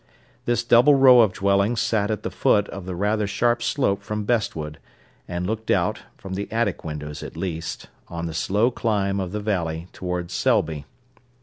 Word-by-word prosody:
This 120 -1 +1
double 120 +5 +6
row 130 -2 +7
of 110 -4 +4
dwellings 100 +3 +1
sat 105 -2 +1
at 110 -2 -2
the - - -3
foot 105 0 +2
of 95 -2 -8
the 90 - -4
rather 105 +3 0
sharp 120 +4 +1
slope 115 -4 0
from 105 +1 -4
Bestwood, 80 -10 -1 0.5
and 90 0 -3
looked 110 +3 -4
out, - - +1 0.2
from 95 -1 -8
the 100 +2 -4
attic 110 -4 -1
windows 75 -2 -6
at - - -8
least, 85 -3 -4 0.2
on 85 0 -5
the 80 - -4
slow 105 +9 +1
climb 100 -4 0
of 95 -2 -3
the 105 - -3
valley 85 -5 -2
towards 90 -1 -4
Selby. 75 -3 +1
100 Hz, 180 wpm, -23 LUFS, 90-110 Hz, 0.5 s, row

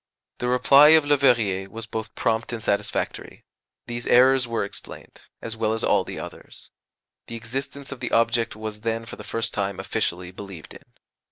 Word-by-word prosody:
The 125 - -2
reply 135 +4 +6
of 155 - +1
Leverrier 120 -10 +2
was 115 +2 -7
both 110 0 -6
prompt 115 +1 0
and 115 -2 -5
satisfactory 100 -1 -2 0.4
these 120 0 -5
errors 130 +1 +5
were 115 -3 -1
explained, 100 - -12 0.2
as 115 -1 -4
well 110 -1 0
as 110 - -3
all - - +3
the - - -8
others. - - -9 0.6
The 115 - -7
existence 135 +5 -6
of 140 - -7
the 125 - -3
object 115 -1 +1
was 110 0 -6
then 115 0 -2
for 115 - -8
the 105 - -10
first 115 +2 -2
time 100 -2 -2
officially 90 -2 -2
believed 95 -4 -10
in. - - -14
115 Hz, 175 wpm, -24 LUFS, 105-125 Hz, 0.6 s, reply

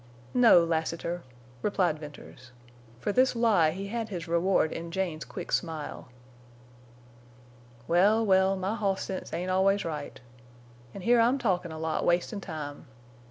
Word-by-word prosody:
"No, 235 -8 +7
Lassiter," 165 +1 -2 0.4
replied 180 -6 +1
Venters. 145 -4 -12 0.5
For 205 - -1
this 255 +4 +3
lie 220 -9 +4
he 195 +5 -5
had 225 0 -3
his 175 -5 -5
reward 170 -1 +2
in 170 0 -5
Jane's 175 -3 -2
quick 180 - -8
smile. 160 -7 -3 1.8
"Well, 205 +6 +4
well, 190 -1 +4
my 190 +2 -2
hoss 200 -3 -1
sense 190 - -6
ain't 180 +2 -2
always 195 +2 +2
right. 150 -3 -5 0.8
An' 200 - -7
here 235 +5 +4
I'm 240 +4 +4
talkin' 185 -9 -1
a 160 - -7
lot, 160 0 -2
wastin' 175 +4 0
time. 150 -4 -7
185 Hz, 140 wpm, -28 LUFS, 165-200 Hz, 1.8 s, No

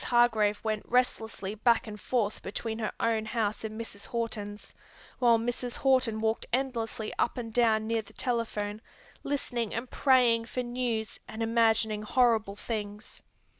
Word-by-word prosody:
Hargrave 225 -4 +3
went 215 -1 -1
restlessly 225 -5 0
back 230 +2 +3
and 210 -2 -8
forth 220 -5 0
between 220 +3 -4
her 215 - -1
own 225 -1 +1
house 215 -1 -1
and 220 0 -5
Mrs. 210 -3 -7
Horton's, 215 -3 -4 0.5
while 235 -2 +5
Mrs. 240 +1 -3
Horton 255 -5 +2
walked 220 0 0
endlessly 235 -4 -2
up - - +1
and 230 -2 -5
down 220 -2 +3
near 225 0 0
the - - -17
telephone, 220 -4 -2 0.4
listening 245 -6 -2
and 235 +3 -3
praying 245 -4 +4
for 250 +1 -3
news 240 -3 -2
and 225 +1 -4
imagining 225 -2 +3
horrible 220 -3 +2
things. 210 -1 -5
225 Hz, 145 wpm, -29 LUFS, 215-240 Hz, 0.5 s, while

